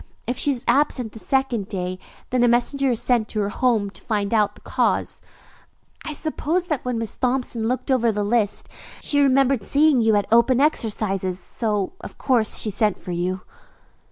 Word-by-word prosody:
If 245 Hz, -, -2 dB
she 285 Hz, -, +1 dB
is 265 Hz, -2 st, -1 dB
absent 260 Hz, -5 st, +2 dB
the 220 Hz, -, -9 dB
second 260 Hz, -5 st, 0 dB
day, 185 Hz, -2 st, -4 dB, 0.3 s
then 250 Hz, -1 st, +2 dB
a -, -, +5 dB
messenger 260 Hz, +3 st, +2 dB
is 235 Hz, -3 st, 0 dB
sent 240 Hz, -4 st, +1 dB
to 215 Hz, -, -4 dB
her 200 Hz, -, -1 dB
home 220 Hz, -3 st, +1 dB
to -, -, -13 dB
find 205 Hz, -1 st, -2 dB
out 210 Hz, -2 st, +2 dB
the -, -, -18 dB
cause. -, -, -1 dB, 0.8 s
I 310 Hz, -, -5 dB
suppose 315 Hz, +3 st, -2 dB
that 305 Hz, -7 st, -2 dB
when 250 Hz, -2 st, -2 dB
Miss 225 Hz, -2 st, -4 dB
Thompson 250 Hz, -3 st, -1 dB
looked 255 Hz, +3 st, -2 dB
over 240 Hz, -3 st, +3 dB
the 210 Hz, -1 st, -2 dB
list, 210 Hz, -1 st, 0 dB, 0.3 s
she 285 Hz, -1 st, +1 dB
remembered 270 Hz, -3 st, +3 dB
seeing 285 Hz, +1 st, +3 dB
you 220 Hz, -1 st, +3 dB
at 205 Hz, -1 st, +2 dB
opening 240 Hz, +4 st, +5 dB
exercises, 195 Hz, -, -1 dB
so 210 Hz, -, -2 dB
of -, -, -9 dB
course 235 Hz, -5 st, +2 dB
sent 210 Hz, -1 st, 0 dB
for 180 Hz, -, -8 dB
you." 180 Hz, +2 st, -2 dB
235 Hz, 185 wpm, -22 LUFS, 210-265 Hz, 0.8 s, a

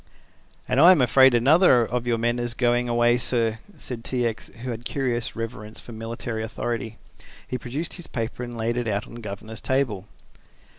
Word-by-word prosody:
"And 125 Hz, +1 st, +1 dB
I 175 Hz, +3 st, +10 dB
am 175 Hz, -, +1 dB
afraid 130 Hz, 0 st, +6 dB
another 130 Hz, 0 st, +5 dB
of 120 Hz, +1 st, -3 dB
your 120 Hz, -1 st, +2 dB
men 120 Hz, +1 st, 0 dB
is 120 Hz, -1 st, -3 dB
going 120 Hz, 0 st, +1 dB
away, 120 Hz, +1 st, +3 dB
sir," 115 Hz, -3 st, 0 dB, 0.2 s
said 120 Hz, -3 st, -7 dB
T. 125 Hz, -1 st, -1 dB
X., 115 Hz, 0 st, -3 dB
who 125 Hz, -, -3 dB
had 115 Hz, -, -4 dB
a -, -, -17 dB
curious 120 Hz, -3 st, -2 dB
reverence 110 Hz, -1 st, -6 dB
for -, -, -11 dB
military 115 Hz, 0 st, -5 dB
authority. 115 Hz, 0 st, -4 dB, 0.5 s
He 125 Hz, -, -3 dB
produced 140 Hz, +9 st, -4 dB
his 175 Hz, -, -9 dB
paper 115 Hz, +1 st, -4 dB
and 120 Hz, -1 st, -6 dB
laid 115 Hz, +1 st, -1 dB
it 120 Hz, -1 st, -1 dB
on 105 Hz, 0 st, -2 dB
the 120 Hz, -, -8 dB
governor's 105 Hz, +1 st, -7 dB
table. 120 Hz, -8 st, -1 dB
120 Hz, 190 wpm, -24 LUFS, 115-125 Hz, 0.5 s, I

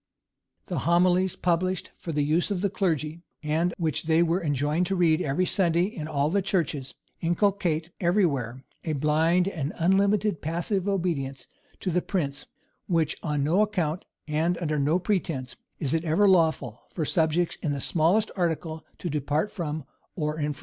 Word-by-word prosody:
The 175 Hz, -6 st, -2 dB
homilies 180 Hz, +3 st, +3 dB
published 180 Hz, +1 st, 0 dB
for 170 Hz, -, -6 dB
the 150 Hz, -2 st, +1 dB
use 160 Hz, +6 st, +1 dB
of 195 Hz, -3 st, -1 dB
the 200 Hz, -1 st, 0 dB
clergy, 165 Hz, -4 st, -1 dB, 0.2 s
and 160 Hz, +4 st, +1 dB
which 160 Hz, -2 st, -1 dB
they 160 Hz, +1 st, +4 dB
were 170 Hz, +2 st, 0 dB
enjoined 150 Hz, +4 st, +1 dB
to 195 Hz, -, 0 dB
read 170 Hz, -2 st, +3 dB
every 170 Hz, +4 st, +1 dB
Sunday 175 Hz, -2 st, +2 dB
in 170 Hz, -6 st, -4 dB
all 150 Hz, 0 st, 0 dB
the 200 Hz, +2 st, +2 dB
churches, 155 Hz, -8 st, -1 dB, 0.2 s
inculcate 175 Hz, -2 st, 0 dB
every 180 Hz, +3 st, +3 dB
where 130 Hz, -4 st, -2 dB, 0.2 s
a 160 Hz, -, -1 dB
blind 160 Hz, +5 st, +2 dB
and 155 Hz, -6 st, -3 dB
unlimited 195 Hz, +1 st, +2 dB
passive 175 Hz, +5 st, -1 dB
obedience 160 Hz, -9 st, -2 dB, 0.4 s
to 185 Hz, -, -1 dB
the 180 Hz, +2 st, +2 dB
prince, 145 Hz, -9 st, -3 dB, 0.4 s
which 165 Hz, -4 st, +1 dB
on 150 Hz, -3 st, -1 dB
no 170 Hz, +8 st, +3 dB
account, 180 Hz, -6 st, 0 dB, 0.2 s
and 160 Hz, +3 st, +1 dB
under 155 Hz, -3 st, -1 dB
no 150 Hz, +5 st, +3 dB
pretence, 170 Hz, -, -2 dB, 0.2 s
is 140 Hz, -1 st, -1 dB
it 165 Hz, 0 st, +1 dB
ever 175 Hz, +5 st, +3 dB
lawful 160 Hz, -, +2 dB
for 160 Hz, -, -3 dB
subjects 160 Hz, +2 st, +1 dB
in 155 Hz, -, -1 dB
the 140 Hz, -, -2 dB
smallest 175 Hz, +10 st, +2 dB
article 160 Hz, -3 st, -2 dB
to -, -, -5 dB
depart 150 Hz, +5 st, -1 dB
from 155 Hz, -5 st, -4 dB, 0.3 s
or 150 Hz, -2 st, -2 dB
infringe. 150 Hz, -2 st, -2 dB
165 Hz, 165 wpm, -26 LUFS, 150-180 Hz, 0.4 s, they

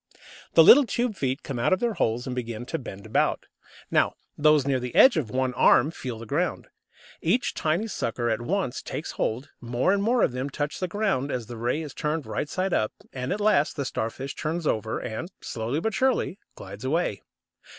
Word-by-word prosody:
The 165 Hz, -, +9 dB
little 260 Hz, -, +8 dB
tube 235 Hz, +1 st, -1 dB
feet 135 Hz, -3 st, -2 dB
come 135 Hz, -4 st, -4 dB
out 120 Hz, -, +3 dB
of 185 Hz, -, +2 dB
their 240 Hz, -2 st, 0 dB
holes 115 Hz, -, 0 dB
and 125 Hz, -, -4 dB
begin 120 Hz, -1 st, -4 dB
to 165 Hz, +5 st, -3 dB
bend 100 Hz, -6 st, -9 dB
about. -, -, +1 dB, 0.5 s
Now -, -, +2 dB, 0.2 s
those 150 Hz, -2 st, +4 dB
near 135 Hz, -2 st, +1 dB
the 125 Hz, -1 st, -6 dB
edge 265 Hz, -, +8 dB
of 145 Hz, -9 st, -1 dB
one 130 Hz, +2 st, 0 dB
"arm" 150 Hz, -, +5 dB
feel 125 Hz, -7 st, -6 dB
the 115 Hz, -, -8 dB
ground. 160 Hz, +9 st, -2 dB, 0.5 s
Each 250 Hz, +3 st, +1 dB
tiny 160 Hz, +7 st, 0 dB
sucker 120 Hz, -, -2 dB
at 110 Hz, 0 st, 0 dB
once 150 Hz, -2 st, -1 dB
takes -, -, -5 dB
hold, 125 Hz, +6 st, -2 dB
more 120 Hz, +9 st, +1 dB
and 200 Hz, -, +1 dB
more 235 Hz, +4 st, +2 dB
of -, -, +3 dB
them 130 Hz, +3 st, -3 dB
touch 145 Hz, +1 st, -3 dB
the 185 Hz, -, -1 dB
ground 195 Hz, -9 st, 0 dB
as 125 Hz, -3 st, -3 dB
the 120 Hz, +2 st, -8 dB
ray 120 Hz, +7 st, -1 dB
is 150 Hz, -, -8 dB
turned 150 Hz, -1 st, -2 dB
right 110 Hz, +6 st, -3 dB
side 185 Hz, +3 st, -1 dB
up, 110 Hz, -, +1 dB, 0.2 s
and 130 Hz, -1 st, -4 dB
at 200 Hz, -, -1 dB
last 205 Hz, -8 st, +3 dB
the 140 Hz, -, -2 dB
Starfish 130 Hz, +3 st, -3 dB
turns 160 Hz, +2 st, -3 dB
over, 110 Hz, -4 st, 0 dB
and, 120 Hz, +10 st, -5 dB
slowly 115 Hz, +6 st, -3 dB
but 220 Hz, +5 st, -1 dB
surely, 260 Hz, -6 st, +1 dB, 0.2 s
glides 100 Hz, +3 st, -10 dB
away. 140 Hz, -, 0 dB
140 Hz, 205 wpm, -26 LUFS, 120-180 Hz, 0.5 s, The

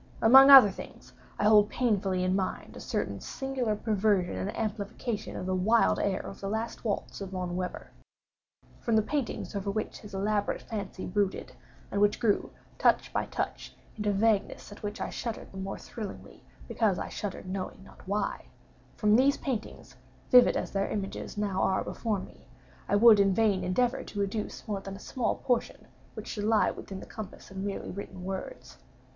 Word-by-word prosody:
Among 265 Hz, +4 st, +9 dB
other 265 Hz, -8 st, +11 dB
things, -, -, -11 dB, 0.2 s
I -, -, -1 dB
hold 210 Hz, -1 st, +6 dB
painfully 195 Hz, -6 st, 0 dB
in 185 Hz, +1 st, +1 dB
mind 190 Hz, -1 st, -3 dB
a -, -, -8 dB
certain -, -, -3 dB
singular 260 Hz, -5 st, -2 dB
perversion 205 Hz, -, +1 dB
and 95 Hz, 0 st, -4 dB
amplification 215 Hz, +1 st, -3 dB
of 185 Hz, -, -4 dB
the 185 Hz, -, -1 dB
wild 215 Hz, +6 st, +3 dB
air 195 Hz, -2 st, 0 dB
of -, -, -9 dB
the 195 Hz, -, -3 dB
last 220 Hz, +2 st, -3 dB
waltz 210 Hz, -2 st, -3 dB
of 195 Hz, -, -5 dB
Von 180 Hz, -2 st, -4 dB
Weber. 180 Hz, 0 st, -5 dB, 0.9 s
From 230 Hz, -, 0 dB
the 220 Hz, -, +4 dB
paintings 275 Hz, -4 st, -3 dB
over 200 Hz, 0 st, -2 dB
which 215 Hz, +2 st, -3 dB
his 210 Hz, -2 st, -10 dB
elaborate 205 Hz, +1 st, -1 dB
fancy 200 Hz, -4 st, -5 dB
brooded, 200 Hz, +1 st, -1 dB, 0.4 s
and 200 Hz, -, 0 dB
which 205 Hz, 0 st, +3 dB
grew, 220 Hz, -4 st, +1 dB, 0.3 s
touch -, -, +3 dB
by -, -, -1 dB
touch, -, -, -4 dB, 0.2 s
into 210 Hz, -1 st, 0 dB
vaguenesses 205 Hz, 0 st, +1 dB
at 205 Hz, -, -11 dB
which 205 Hz, 0 st, -5 dB
I -, -, -3 dB
shuddered 230 Hz, -2 st, -5 dB
the 190 Hz, -, -8 dB
more 195 Hz, +1 st, -4 dB
thrillingly, 215 Hz, -4 st, -9 dB, 0.2 s
because 210 Hz, -5 st, +1 dB
I -, -, -3 dB
shuddered 200 Hz, -3 st, -5 dB
knowing 190 Hz, 0 st, -5 dB
not -, -, -16 dB
why—from 210 Hz, +1 st, -2 dB
these 270 Hz, +4 st, +4 dB
paintings 245 Hz, -6 st, -5 dB, 0.4 s
(vivid 250 Hz, -1 st, +7 dB
as -, -, -3 dB
their 195 Hz, 0 st, -1 dB
images 200 Hz, 0 st, -4 dB
now 200 Hz, -2 st, -1 dB
are 190 Hz, -, +2 dB
before 220 Hz, -3 st, -2 dB
me) 185 Hz, -, -13 dB, 0.4 s
I 200 Hz, -, +3 dB
would 215 Hz, 0 st, +8 dB
in 195 Hz, -1 st, +4 dB
vain 205 Hz, -4 st, +2 dB
endeavor 245 Hz, +8 st, +1 dB
to 200 Hz, -1 st, -3 dB
educe 205 Hz, +2 st, -4 dB
more 205 Hz, -2 st, -2 dB
than 195 Hz, 0 st, -7 dB
a -, -, -10 dB
small 245 Hz, +3 st, -1 dB
portion 245 Hz, -2 st, -1 dB, 0.3 s
which -, -, -7 dB
should 205 Hz, -2 st, -4 dB
lie 220 Hz, -1 st, +3 dB
within 190 Hz, -1 st, -8 dB
the -, -, -9 dB
compass 215 Hz, -3 st, -9 dB
of 190 Hz, -, -9 dB
merely 195 Hz, +1 st, -4 dB
written 190 Hz, -1 st, -8 dB
words. 195 Hz, -, -6 dB
205 Hz, 180 wpm, -29 LUFS, 195-225 Hz, 0.9 s, other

